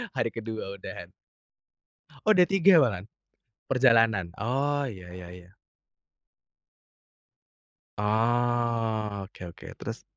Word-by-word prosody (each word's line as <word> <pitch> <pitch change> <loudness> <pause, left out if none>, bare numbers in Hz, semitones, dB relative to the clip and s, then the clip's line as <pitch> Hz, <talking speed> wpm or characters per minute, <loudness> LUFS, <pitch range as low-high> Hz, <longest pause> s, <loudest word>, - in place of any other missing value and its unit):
Hari 115 -3 0
kedua 110 -3 -6
udahan. - - -8 1.1
Oh 215 - +5
udah 180 -2 +6
3 195 -2 +5
malahan. 105 -8 0 0.6
Perjalanan, 115 -8 +3
oh 140 +5 0
ya 95 -6 -9
ya 90 -1 -9
ya. 90 0 -13 2.5
Oh. 115 -1 0
Oke 90 -2 -10
oke, 85 - -12
terus? - - -6
115 Hz, 95 wpm, -27 LUFS, 100-125 Hz, 2.5 s, udah